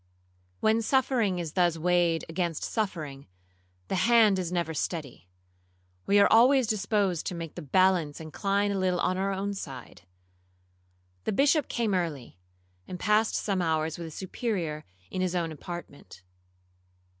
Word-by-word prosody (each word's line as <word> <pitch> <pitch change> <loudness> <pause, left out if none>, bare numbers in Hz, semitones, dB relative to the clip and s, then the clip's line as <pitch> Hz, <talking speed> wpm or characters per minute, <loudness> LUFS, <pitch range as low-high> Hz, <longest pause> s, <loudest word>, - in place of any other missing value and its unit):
When 220 +1 +3
suffering 235 -6 +1
is 165 -3 -4
thus 175 -3 +2
weighed 175 0 +1
against 170 -1 -2
suffering, 155 -10 -3 0.6
the - - -4 0.2
hand 220 -5 +5
is 175 -2 -3
never 170 -2 -1
steady; 145 - -4 0.8
we 205 +1 +5
are 200 - +6
always 255 +3 +6
disposed 200 -4 0
to 180 - -3
make 165 -2 -6
the 175 - -7
balance 175 -1 +2
incline 200 +6 -1
a 195 - -1
little 185 -1 +1
on 185 - +1
our 195 +1 0
own 195 +1 -2
side. 135 - -8 1.2
The - - 0
Bishop 285 +5 +3
came 230 -4 -1
early, 155 - -3 0.5
and 180 - -7
passed 215 +2 +2
some 195 -3 -1
hours 160 -1 -1
with 170 - -5
the - - -9
Superior 180 -4 -3 0.3
in 185 - -2
his 185 -1 -1
own 170 -2 -1
apartment. 145 - -9
180 Hz, 145 wpm, -28 LUFS, 160-205 Hz, 1.2 s, are